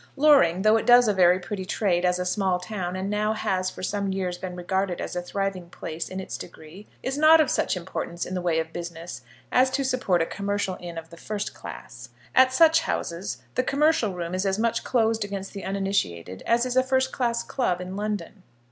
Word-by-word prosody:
Loring, 270 Hz, -, +5 dB
though 215 Hz, +1 st, +5 dB
it -, -, -3 dB
does 245 Hz, -1 st, +7 dB
a 210 Hz, -, +3 dB
very 180 Hz, -1 st, +5 dB
pretty 190 Hz, +2 st, -5 dB
trade 185 Hz, -2 st, 0 dB
as 180 Hz, 0 st, +2 dB
a 180 Hz, -, -2 dB
small 185 Hz, 0 st, +1 dB
town, 180 Hz, -2 st, -4 dB
and 190 Hz, +1 st, -3 dB
now 210 Hz, +1 st, 0 dB
has 185 Hz, -3 st, -1 dB
for -, -, -10 dB
some 200 Hz, 0 st, -1 dB
years 185 Hz, -2 st, -2 dB
been 180 Hz, 0 st, -6 dB
regarded 185 Hz, 0 st, -1 dB
as -, -, -5 dB
a 180 Hz, -, -1 dB
thriving 190 Hz, -1 st, -3 dB
place 160 Hz, -1 st, -6 dB
in 185 Hz, -, -5 dB
its 190 Hz, -, -6 dB
degree, 175 Hz, +4 st, -11 dB, 0.2 s
is 270 Hz, +2 st, -2 dB
not 315 Hz, +1 st, +7 dB
of 310 Hz, -, +3 dB
such -, -, 0 dB
importance 175 Hz, -1 st, -4 dB
in 185 Hz, -, -6 dB
the 180 Hz, -, -2 dB
way 170 Hz, -2 st, +1 dB
of 160 Hz, 0 st, -2 dB
business 170 Hz, 0 st, -7 dB, 0.3 s
as 255 Hz, +1 st, +4 dB
to 275 Hz, +1 st, -1 dB
support 250 Hz, -9 st, +1 dB
a 165 Hz, -, +2 dB
commercial 200 Hz, 0 st, -2 dB
inn 170 Hz, -1 st, -8 dB
of 165 Hz, 0 st, -8 dB
the 170 Hz, -, -12 dB
first 210 Hz, +3 st, -4 dB
class. -, -, -10 dB, 0.2 s
At 260 Hz, 0 st, +6 dB
such 325 Hz, +4 st, +6 dB
houses 180 Hz, -, -4 dB
the -, -, +2 dB
commercial 275 Hz, -, +2 dB
room 170 Hz, 0 st, -4 dB
is 185 Hz, +1 st, 0 dB
as 195 Hz, -1 st, 0 dB
much 230 Hz, +1 st, 0 dB
closed 225 Hz, -3 st, +1 dB
against 195 Hz, -1 st, -6 dB
the 200 Hz, -, -7 dB
uninitiated 100 Hz, -, -2 dB
as 235 Hz, +1 st, +3 dB
is 250 Hz, 0 st, -2 dB
a 260 Hz, -, +6 dB
first 260 Hz, 0 st, +1 dB
class 235 Hz, -2 st, -1 dB
club 185 Hz, -10 st, -1 dB
in 180 Hz, +1 st, -6 dB
London. 210 Hz, -1 st, -4 dB
195 Hz, 220 wpm, -25 LUFS, 180-230 Hz, 0.3 s, does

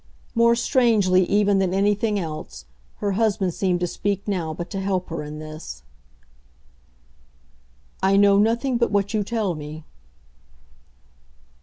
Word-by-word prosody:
More 235 Hz, 0 st, +4 dB
strangely 220 Hz, -7 st, +3 dB
even 205 Hz, -1 st, +3 dB
than 190 Hz, -1 st, 0 dB
anything 205 Hz, +2 st, +1 dB
else, 155 Hz, -, -6 dB, 0.3 s
her 205 Hz, -1 st, -2 dB
husband 195 Hz, -3 st, 0 dB
seemed 180 Hz, -1 st, 0 dB
to -, -, +2 dB
speak 200 Hz, +3 st, -3 dB
now 175 Hz, -6 st, -1 dB
but 170 Hz, +3 st, -7 dB
to 195 Hz, -, -3 dB
help 190 Hz, -1 st, -2 dB
her 165 Hz, -1 st, -4 dB
in 150 Hz, 0 st, -7 dB
this. 155 Hz, -, -9 dB, 2.2 s
"I 195 Hz, +1 st, +3 dB
know 200 Hz, 0 st, +5 dB
nothing 235 Hz, +4 st, +1 dB
but 235 Hz, -, +2 dB
what 200 Hz, 0 st, 0 dB
you 215 Hz, -1 st, +1 dB
tell 210 Hz, -3 st, -1 dB
me." 155 Hz, 0 st, -8 dB
195 Hz, 135 wpm, -23 LUFS, 175-210 Hz, 2.2 s, know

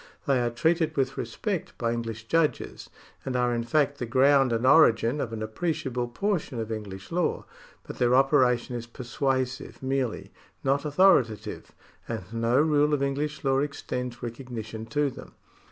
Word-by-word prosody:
They 135 Hz, -5 st, +2 dB
are 120 Hz, -, +1 dB
treated 160 Hz, +5 st, +1 dB
with 135 Hz, -1 st, 0 dB
respect 175 Hz, -, -4 dB
by 115 Hz, -1 st, 0 dB
English 115 Hz, -2 st, -4 dB
judges, 165 Hz, +4 st, -1 dB, 0.3 s
and 130 Hz, -, -3 dB
are 125 Hz, -1 st, +2 dB
in 120 Hz, 0 st, -1 dB
fact 145 Hz, +3 st, +1 dB
the 125 Hz, -, -3 dB
ground 135 Hz, +1 st, +4 dB
and 115 Hz, +2 st, 0 dB
origin 130 Hz, -2 st, +5 dB
of 115 Hz, -, -3 dB
an 110 Hz, -1 st, -4 dB
appreciable 125 Hz, 0 st, -2 dB
portion 155 Hz, -, -2 dB
of 110 Hz, 0 st, -4 dB
English 100 Hz, -3 st, -7 dB
law, 175 Hz, +1 st, 0 dB, 0.4 s
but -, -, -9 dB
their 125 Hz, 0 st, +4 dB
operation 125 Hz, -2 st, +3 dB
is 120 Hz, 0 st, -5 dB
persuasive 130 Hz, +2 st, -3 dB
merely, 130 Hz, -3 st, -2 dB, 0.3 s
not 140 Hz, +2 st, +1 dB
authorita 145 Hz, -, +4 dB
tive, 105 Hz, -, -8 dB, 0.4 s
and 115 Hz, -4 st, -4 dB
no 115 Hz, +2 st, +2 dB
rule 150 Hz, -1 st, +3 dB
of 140 Hz, -, -2 dB
English 145 Hz, +2 st, -2 dB
law 135 Hz, -1 st, +2 dB
extends 125 Hz, -4 st, -4 dB
recognition 115 Hz, -2 st, -6 dB
to 145 Hz, +4 st, 0 dB
them. -, -, -12 dB
130 Hz, 160 wpm, -27 LUFS, 115-145 Hz, 0.4 s, origin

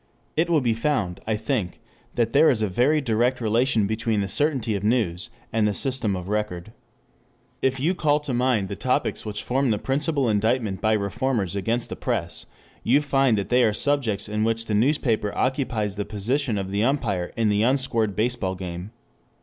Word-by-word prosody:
It 165 Hz, +2 st, +1 dB
will 160 Hz, -3 st, +3 dB
be 120 Hz, -3 st, +1 dB
found, 110 Hz, -7 st, -1 dB
I 110 Hz, -, +1 dB
think, 110 Hz, -3 st, -2 dB, 0.4 s
that 115 Hz, -1 st, 0 dB
there 155 Hz, +3 st, +6 dB
is 110 Hz, -4 st, +1 dB
a -, -, +2 dB
very 130 Hz, +11 st, +2 dB
direct 120 Hz, +1 st, +1 dB
relation 115 Hz, -1 st, +2 dB
between 110 Hz, 0 st, 0 dB
the 100 Hz, -, -1 dB
certainty 135 Hz, -3 st, 0 dB
of 100 Hz, -1 st, -3 dB
news 105 Hz, -4 st, 0 dB, 0.2 s
and 110 Hz, -1 st, +2 dB
the 105 Hz, -, -1 dB
system 130 Hz, -7 st, -1 dB
of 90 Hz, 0 st, -6 dB
record. 105 Hz, -2 st, -3 dB, 0.9 s
If 130 Hz, 0 st, +1 dB
you 160 Hz, +7 st, +1 dB
call 150 Hz, -4 st, +2 dB
to 145 Hz, -3 st, -4 dB
mind 120 Hz, -5 st, +1 dB
the -, -, -5 dB
topics -, -, -1 dB
which 105 Hz, 0 st, -4 dB
form 135 Hz, +1 st, +1 dB
the 105 Hz, -, +2 dB
principal 140 Hz, +2 st, 0 dB
indictment 110 Hz, -1 st, 0 dB
by 110 Hz, 0 st, +2 dB
reformers 105 Hz, -1 st, -1 dB
against 115 Hz, +5 st, -1 dB
the -, -, -4 dB
press, 85 Hz, 0 st, -3 dB, 0.3 s
you 130 Hz, +5 st, +3 dB
find 135 Hz, -5 st, +2 dB
they 120 Hz, +5 st, +2 dB
are 110 Hz, -2 st, +3 dB
subjects 115 Hz, -5 st, 0 dB
in 105 Hz, +1 st, -1 dB
which 115 Hz, 0 st, 0 dB
the 110 Hz, -, -3 dB
newspaper 115 Hz, -3 st, +1 dB
occupies 120 Hz, -6 st, -1 dB
the 105 Hz, -, -1 dB
position 115 Hz, +3 st, -1 dB
of 95 Hz, -1 st, -4 dB
the 100 Hz, +2 st, +1 dB
umpire 115 Hz, -9 st, 0 dB
in 115 Hz, -2 st, +2 dB
the 105 Hz, 0 st, +2 dB
unscored 115 Hz, -4 st, +1 dB
baseball 110 Hz, -4 st, -1 dB
game. 90 Hz, 0 st, -6 dB
115 Hz, 185 wpm, -24 LUFS, 105-130 Hz, 0.9 s, there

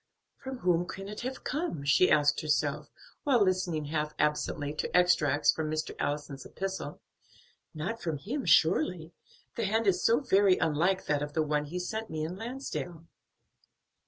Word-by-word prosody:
"From 265 Hz, 0 st, -6 dB
whom 175 Hz, -5 st, +1 dB
can 195 Hz, 0 st, -7 dB
it 210 Hz, +1 st, -6 dB
have 255 Hz, +2 st, -5 dB
come?" 290 Hz, -, -3 dB
she 165 Hz, +6 st, +5 dB
asked 145 Hz, -1 st, +3 dB
herself, 150 Hz, -1 st, 0 dB, 0.3 s
while 250 Hz, -7 st, +4 dB
listening 180 Hz, -5 st, 0 dB
half 150 Hz, 0 st, -2 dB
absently 150 Hz, -1 st, 0 dB
to 150 Hz, -, -3 dB
extracts 160 Hz, -5 st, +4 dB
from 155 Hz, -1 st, -3 dB
Mr. 155 Hz, 0 st, -3 dB
Allison's 145 Hz, -2 st, -3 dB
epistle; 190 Hz, -6 st, -5 dB, 0.7 s
"not 190 Hz, +10 st, -4 dB
from 165 Hz, -3 st, -2 dB
him 250 Hz, -, -4 dB
surely, 160 Hz, 0 st, +3 dB, 0.4 s
the -, -, -1 dB
hand 220 Hz, +3 st, +1 dB
is 185 Hz, -2 st, +2 dB
so 230 Hz, +2 st, +4 dB
very 200 Hz, -8 st, +4 dB
unlike 170 Hz, +5 st, +1 dB
that 145 Hz, -1 st, 0 dB
of 145 Hz, 0 st, -4 dB
the 160 Hz, -, +1 dB
one 150 Hz, -1 st, 0 dB
he 165 Hz, +5 st, -5 dB
sent 220 Hz, +5 st, -4 dB
me 155 Hz, -1 st, -3 dB
in 165 Hz, +3 st, -4 dB
Lansdale." 225 Hz, -, -6 dB
170 Hz, 160 wpm, -30 LUFS, 150-195 Hz, 0.7 s, she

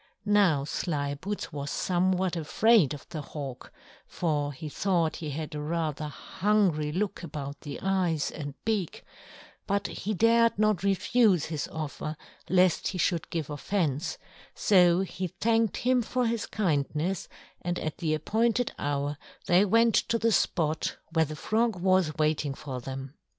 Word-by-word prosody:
Now 200 Hz, -9 st, +4 dB
Slyboots 145 Hz, +5 st, -3 dB
was 140 Hz, -1 st, -4 dB
somewhat 185 Hz, +1 st, +1 dB
afraid 170 Hz, -, +3 dB
of 140 Hz, -, -13 dB
the 155 Hz, -, -5 dB
Hawk, 140 Hz, -3 st, -7 dB, 0.4 s
for 150 Hz, -4 st, -1 dB
he 145 Hz, +3 st, -7 dB
thought 170 Hz, 0 st, 0 dB
he 155 Hz, -, -5 dB
had 155 Hz, +2 st, -5 dB
rather 155 Hz, 0 st, -2 dB
a -, -, -3 dB
hungry 170 Hz, -1 st, 0 dB
look 200 Hz, +4 st, -2 dB
about 145 Hz, -4 st, -6 dB
the 145 Hz, -2 st, -6 dB
eyes 180 Hz, -6 st, +1 dB
and 145 Hz, -3 st, -6 dB
beak, 210 Hz, -6 st, -1 dB, 0.6 s
but 200 Hz, 0 st, 0 dB
he 210 Hz, +3 st, -3 dB
dared 230 Hz, +2 st, +4 dB
not 215 Hz, -3 st, +2 dB
refuse 200 Hz, -1 st, +3 dB
his 155 Hz, -2 st, -3 dB
offer 155 Hz, 0 st, -5 dB, 0.3 s
lest 185 Hz, -2 st, +3 dB
he 190 Hz, -, -3 dB
should 170 Hz, -1 st, 0 dB
give 160 Hz, -4 st, -3 dB
offence; 150 Hz, -1 st, -1 dB, 0.4 s
so 180 Hz, -3 st, +5 dB
he 185 Hz, -1 st, -3 dB
thanked 225 Hz, +3 st, +1 dB
him 250 Hz, 0 st, +2 dB
for 245 Hz, +2 st, -1 dB
his 230 Hz, -2 st, -1 dB
kindness, 165 Hz, -1 st, -1 dB, 0.3 s
and 175 Hz, 0 st, -2 dB
at 155 Hz, -2 st, -4 dB
the 155 Hz, -3 st, +1 dB
appointed 230 Hz, +9 st, +1 dB
hour 145 Hz, 0 st, -2 dB, 0.3 s
they 180 Hz, +3 st, +5 dB
went 230 Hz, +3 st, +4 dB
to 230 Hz, -, +2 dB
the 230 Hz, 0 st, +2 dB
spot 160 Hz, -6 st, 0 dB, 0.2 s
where 160 Hz, -1 st, +3 dB
the 155 Hz, +1 st, -6 dB
Frog 225 Hz, +6 st, +1 dB
was 185 Hz, -4 st, +2 dB
waiting 150 Hz, -2 st, +1 dB
for 130 Hz, -4 st, -6 dB
them. 135 Hz, +1 st, -6 dB
170 Hz, 150 wpm, -28 LUFS, 150-200 Hz, 0.6 s, so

